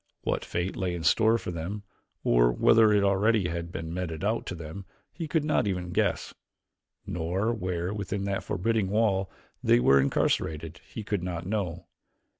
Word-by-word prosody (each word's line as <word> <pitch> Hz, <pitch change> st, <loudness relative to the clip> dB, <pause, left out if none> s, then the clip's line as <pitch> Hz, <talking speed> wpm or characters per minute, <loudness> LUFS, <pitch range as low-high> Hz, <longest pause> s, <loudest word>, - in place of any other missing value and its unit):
What -, -, -1 dB
fate 90 Hz, +2 st, -3 dB
lay 90 Hz, -2 st, -2 dB
in 85 Hz, -, -5 dB
store 110 Hz, +7 st, +4 dB
for 100 Hz, -, -5 dB
them 90 Hz, +5 st, -5 dB, 0.4 s
or -, -, +4 dB
whether 110 Hz, -, +5 dB
already 100 Hz, +1 st, +3 dB
it 85 Hz, -, -1 dB
had 85 Hz, 0 st, -4 dB
been 80 Hz, -1 st, -5 dB
meted 85 Hz, -2 st, -4 dB
out 110 Hz, +3 st, 0 dB
to 90 Hz, -, -4 dB
them 85 Hz, +4 st, -8 dB, 0.3 s
he 165 Hz, -2 st, -5 dB
could 155 Hz, 0 st, +1 dB
not 150 Hz, -8 st, +1 dB
even 90 Hz, -2 st, -2 dB
guess, -, -, 0 dB, 0.7 s
nor 90 Hz, +7 st, -1 dB
where, 90 Hz, -3 st, -2 dB
within 100 Hz, -1 st, -3 dB
that 100 Hz, 0 st, -2 dB
forbidding 105 Hz, 0 st, 0 dB
wall, 100 Hz, -2 st, +1 dB, 0.3 s
they -, -, +5 dB
were 70 Hz, +2 st, +5 dB
incarcerated 80 Hz, +3 st, -1 dB
he 110 Hz, -, -5 dB
could 105 Hz, -2 st, -2 dB
not 85 Hz, -1 st, -4 dB
know. 95 Hz, -4 st, -3 dB
95 Hz, 170 wpm, -28 LUFS, 85-105 Hz, 0.7 s, whether